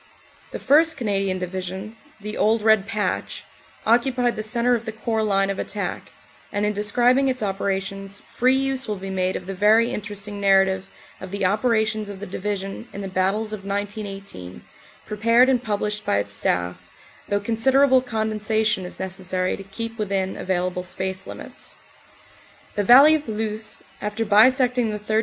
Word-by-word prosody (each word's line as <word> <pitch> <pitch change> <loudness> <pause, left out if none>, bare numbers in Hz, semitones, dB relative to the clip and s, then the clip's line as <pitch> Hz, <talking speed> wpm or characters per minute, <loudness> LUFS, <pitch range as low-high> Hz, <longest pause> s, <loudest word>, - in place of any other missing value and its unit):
The - - -5
1st 315 +3 +4
Canadian 195 -5 0
Division, 190 +3 -5 0.2
the 210 +1 -6
"Old 220 0 +2
Red 220 -2 +4
Patch," 215 -2 -2 0.4
occupied 245 +1 +2
the - - -3
centre 235 +3 +1
of 235 -1 -1
the 220 - -3
Corps 220 0 -2
line 195 -2 +1
of 195 - -5
attack, 205 0 -4 0.4
and 205 0 0
in 210 - 0
describing 245 +6 +3
its 255 -3 -1
operations 195 0 -3
free 255 +2 +3
use 270 -1 0
will 210 - -2
be 195 0 -6
made 185 0 0
of 180 - -5
the 195 - -5
very 215 +5 +4
interesting 205 -2 -5
narra 195 -1 +5
tive 190 0 -4 0.3
of 190 - -8
the 200 0 -2
operations 215 +1 +1
of 200 -2 -8
the 205 - -6
Division 200 +2 -4
in 200 - -7
the 195 - -4
battles 195 +4 0
of 205 -2 -6
1918, 200 - -6 0.4
prepared 230 +4 +3
and 255 -2 +2
published 210 -1 -2
by - - +1
its 100 0 -2
Staff, 90 -2 -2 0.4
though 205 - +1
considerable 260 +5 +3
con 220 -3 -2
densation 215 -2 0
is 180 - -9
necessary 185 -1 -1
to - - -10
keep 230 +4 -7
within 195 -2 -1
available 180 -1 -1
space 190 +1 -4
limits. - - -9 1.0
The 205 - 0
valley 270 +8 +8
of 305 -1 -1
the 220 - -3
Luce, 215 0 -3 0.2
after 210 +2 -2
bisecting 245 +3 +4
the 210 - -3
3rd. 215 +1 0
210 Hz, 170 wpm, -23 LUFS, 195-230 Hz, 1.0 s, valley